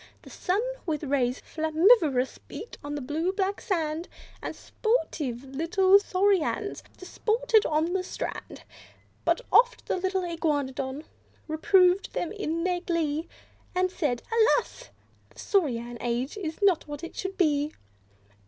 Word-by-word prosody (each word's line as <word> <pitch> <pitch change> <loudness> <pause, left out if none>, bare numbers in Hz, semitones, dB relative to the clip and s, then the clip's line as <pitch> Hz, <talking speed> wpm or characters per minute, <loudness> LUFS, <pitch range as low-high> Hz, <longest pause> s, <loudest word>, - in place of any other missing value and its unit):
The - - -13
sun, 375 +4 0 0.3
with 310 -2 -1
rays 265 -3 0
flammivomous, 315 - +3
beat 455 - -8
on 290 0 -4
the 290 - -3
blue 315 +7 -1
black 390 +1 -1
sand; 330 -4 -1 0.3
And - - -5
sportive 310 - -2
little 335 +8 +4
Saurians 385 -3 +1 0.2
disported 440 +4 +1
on 315 +3 +1
the 380 - +1
strand - - -6 0.6
But - - +2
oft 485 +1 +4
the - - -1
Iguanodon 310 -7 -1 0.4
reproved 365 +3 +3
them 340 - -2
in 335 -6 -2
their 360 -1 0
glee, 325 -2 -1 0.5
And 365 0 +2
said, 275 -10 -1
"Alas! 460 +2 +2 0.4
this - - -11
Saurian 240 - 0
Age 245 +3 -2
is 330 -6 -4
not 375 -6 +3
what 295 +2 -7
it 335 - -7
should 380 0 -4
be!" 295 -4 +2
335 Hz, 130 wpm, -27 LUFS, 290-385 Hz, 0.6 s, little